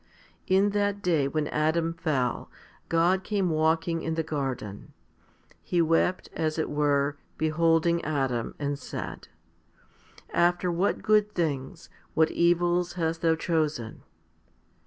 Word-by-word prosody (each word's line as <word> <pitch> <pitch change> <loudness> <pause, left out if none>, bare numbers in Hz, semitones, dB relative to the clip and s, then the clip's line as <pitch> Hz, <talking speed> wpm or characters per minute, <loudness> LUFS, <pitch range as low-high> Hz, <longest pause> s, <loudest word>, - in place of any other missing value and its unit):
In 195 +2 +3
that 205 0 -1
day 160 -6 +2
when 150 +1 -1
Adam 160 +2 +1
fell, 150 -8 -1 0.4
God 175 +3 +2
came 195 -3 0
walking 160 +1 +1
in 160 0 -2
the 160 - 0
garden. 135 -10 -4 0.7
He 175 - -1
wept, 165 +2 +2
as 155 -1 -1
it 160 - -1
were, 145 -1 +1 0.2
beholding 165 +1 +2
Adam, 135 -6 -1
and 145 -1 -3
said, - - -7 0.6
" - - -26
After 175 +1 +2
what 175 +4 0
good 210 -1 +3
things, 160 0 -2 0.3
what 160 0 +3
evils 175 +1 +2
hast 165 -2 -2
thou 165 -1 +3
chosen 155 -8 -2
165 Hz, 125 wpm, -27 LUFS, 150-175 Hz, 0.7 s, In